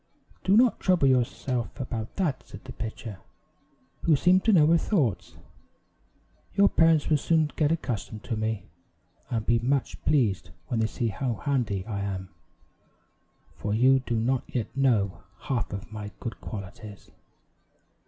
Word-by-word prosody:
"Do 195 +2 +4
not 240 -2 +4
trouble 180 -7 +3
yourself 125 -1 0
about 115 -3 -4
that," 170 -9 0
said - - -11
the 130 - -9
pitcher, 110 -3 -6 0.8
who 160 - +4
seemed 180 +6 +4
to 220 - +5
know 165 -7 +6
her 165 +2 +5
thoughts; 145 - 0 1.2
"your 200 0 +5
parents 165 -2 +4
will 150 -2 +3
soon 160 0 +2
get 150 -1 +2
accustomed 120 -8 -3
to 115 - -3
me, 110 -3 -2 0.6
and 115 -4 -2
be 120 -1 +3
much 135 +3 -1
pleased 120 -11 +1 0.2
when 120 - 0
they 110 - +2
see 115 +1 -2
how 115 +4 -2
handy 115 -7 -1
I 105 -3 -4
am, 95 -2 -4 1.3
for 105 0 -2
you 130 +3 +5
do 125 -2 -3
not 125 +3 +1
yet 120 -2 -4
know 110 -9 +1 0.2
half 130 -6 -2
of 100 +1 -6
my 105 -1 -6
good 115 - -6
qualities." 100 0 -9
125 Hz, 150 wpm, -27 LUFS, 110-150 Hz, 1.3 s, know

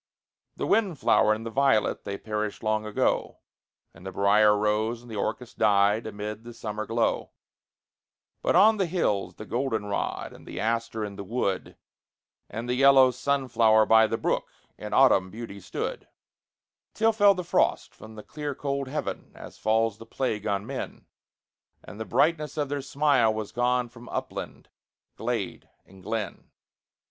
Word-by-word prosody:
The - - -3
wind 200 -8 +2
flower 110 - +3
and 110 +1 -1
the 115 - -5
violet, 135 -4 +2
they 100 0 -4
perished 105 0 -4
long 110 0 0
ago, 105 - 0 0.6
And - - -16
the 95 - -6
brier 105 +2 +4
rose 110 +3 0
and 120 - -12
the - - -5
orchis 120 +4 -3
died 105 +1 +3
amid 105 +1 -6
the 120 0 -10
summer 110 -1 -5
glow; 115 0 0 1.1
But - - +1
on 220 +1 +6
the 190 -3 +1
hills 160 - -1
the 110 - -9
golden 120 -3 -2
rod, 100 -1 -3
and - - -15
the - - -6
aster 115 0 -1
in 100 -1 -8
the 100 - -5
wood, 100 -2 -2 0.7
And 115 +3 -5
the 125 - 0
yellow 135 0 +6
sunflower 120 -4 +3
by 110 0 +6
the 115 - -2
brook, 110 - -1 0.3
in 105 0 -8
autumn 100 -9 +4
beauty 105 -1 -8
stood, 90 -2 -5 0.9
Till 225 +1 +3
fell 205 -2 +5
the 180 - -4
frost 170 - +1
from 110 0 -13
the 105 - -9
clear 150 -2 -5
cold 140 -1 -3
heaven, 150 +3 -4
as - - -11
falls 110 -1 +1
the 115 - -11
plague 110 -5 -2
on 100 0 -1
men, - - -6 0.8
And 105 - -11
the 110 - -4
brightness 155 +2 +1
of 145 -2 -1
their 145 -1 -2
smile 135 -4 +2
was 110 -1 -4
gone 125 0 +1
from 120 +1 -14
upland, - - -5 0.5
glade, - - -4 0.2
and 95 0 -17
glen. 105 -1 -4
115 Hz, 165 wpm, -27 LUFS, 105-135 Hz, 1.1 s, on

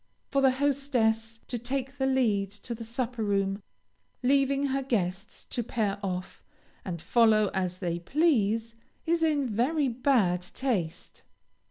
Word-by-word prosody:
For 275 - +2
the 270 - +6
hostess 255 -5 0
to 245 - -3
take 265 +3 -4
the 265 - +2
lead 220 -7 +2
to 240 - -4
the 230 0 -7
supper 235 0 -3
room, 195 -1 0 0.6
leaving 275 +1 +3
her 270 +1 0
guests 195 -7 -2
to 240 - -1
pair 210 -3 -1
off, 185 -2 -4 0.4
and 175 -4 -4
follow 215 +1 +4
as 185 -2 -1
they 175 -2 -2
please, 230 - +1 0.3
is 335 0 +1
in 300 -4 +2
very 260 +6 +1
bad 230 -8 +2
taste. 185 -4 -3
230 Hz, 140 wpm, -28 LUFS, 200-270 Hz, 0.6 s, the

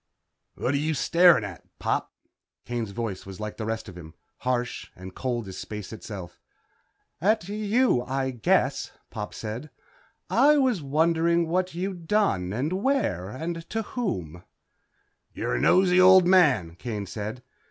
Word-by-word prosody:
"What 130 - -1
are - - +2
you 155 +2 0
staring 170 -5 +5
at, 95 -4 -7
Pop?" - - -1 0.5
Kane's 120 -3 -3
voice 100 -2 -4
was 95 0 -9
like 105 0 -5
the 110 - -4
rest 110 0 -3
of 90 - -10
him. 80 -3 -11 0.2
Harsh 125 -1 -2
and 95 +1 -10
cold 120 -3 -3
as 95 -1 -7
space 105 -1 -7
itself. 100 -5 -8 0.8
"At 210 0 +2
you, 215 - +2
I 130 +1 -2
guess," 120 -4 +1 0.2
Pop 105 -1 -5
said, 115 +7 -6 0.6
"I 300 +1 +5
was 255 - +2
wondering 165 +3 +2
what 180 +1 -1
you'd 180 -2 -4
done 135 - +1
and 135 - -1
where 220 - 0
and 165 +7 -5
to 225 0 -2
whom." 90 - -4 0.9
"You're - - -2
a - - -2
nosey 185 -1 +5
old 185 0 +8
man," 145 - +4
Kane 105 -3 -4
said. 110 +5 -6
130 Hz, 150 wpm, -26 LUFS, -, 0.9 s, old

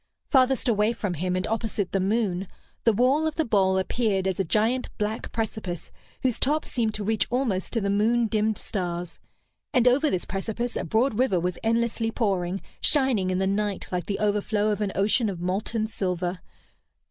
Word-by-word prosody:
Farthest 260 -2 +3
away 215 0 +3
from 205 -5 -3
him, 180 +3 -1
and 185 +1 0
opposite 220 -4 -2
the 195 - +1
moon, 195 -2 0 0.4
the 230 - +6
wall 260 +8 +3
of 310 - -3
the 320 - +1
bowl 190 -4 +3
appeared 195 0 0
as 190 -1 -1
a - - +3
giant 220 +8 +1
black 215 +1 -3
precipice, 215 -6 -4 0.3
whose 255 -3 +1
top 300 +4 +1
seemed 225 -3 -1
to 210 - -4
reach 220 +1 +1
almost 240 -7 0
to 230 - +1
the 200 - -1
moon 230 +4 +3
dimmed 215 0 0
stars; 175 -3 -4 0.6
and 250 -1 +5
over 280 +5 +4
this 185 - -1
precipice 220 +5 -3
a - - -1
broad 230 +1 +1
river 220 -9 +3
was 180 +1 -2
endlessly 230 0 +1
pouring, 195 -5 -1 0.2
shining 260 -10 +3
in 185 - 0
the 190 - +1
night 200 0 -1
like 180 -1 -2
the 200 - -1
overflow 210 0 +1
of 210 0 -2
an 205 -2 0
ocean 210 +3 +2
of 185 -3 -5
molten 200 +5 -1
silver. 180 -4 -2
210 Hz, 185 wpm, -26 LUFS, 190-235 Hz, 0.6 s, the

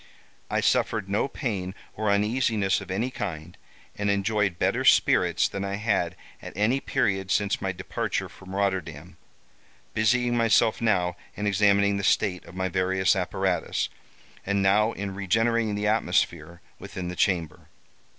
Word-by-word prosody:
I - - 0
suffered 95 - +1
no 100 +6 0
pain 100 -9 -4 0.2
or 110 0 -1
uneasiness 105 -1 +1
of 95 - -10
any 110 +8 -1
kind, 85 - -6 0.4
and 105 0 -1
enjoyed 100 -2 +1
better - - 0
spirits - - +4
than 100 - -5
I 100 0 -2
had 100 -5 0 0.3
at - - -9
any 115 +6 +2
period 95 -7 -1
since 100 0 +1
my 95 -1 -1
departure 90 - -3
from 95 0 -11
Rotterdam, 90 -4 -2 0.8
busying 120 +2 +2
myself 115 -1 +3
now 90 -6 +1 0.2
in 105 - -4
examining 100 0 +3
the 100 - -3
state 95 -2 +1
of 85 - -13
my 95 0 -1
various 95 0 +1
apparatus, - - -1 0.5
and 100 0 0
now 105 +3 +3
in 100 -1 -5
regenerating 110 +3 +1
the 105 0 -2
atmosphere 85 -5 0 0.2
within 90 -2 -6
the 90 - -5
chamber. 85 -5 -1
100 Hz, 145 wpm, -26 LUFS, 95-105 Hz, 0.8 s, spirits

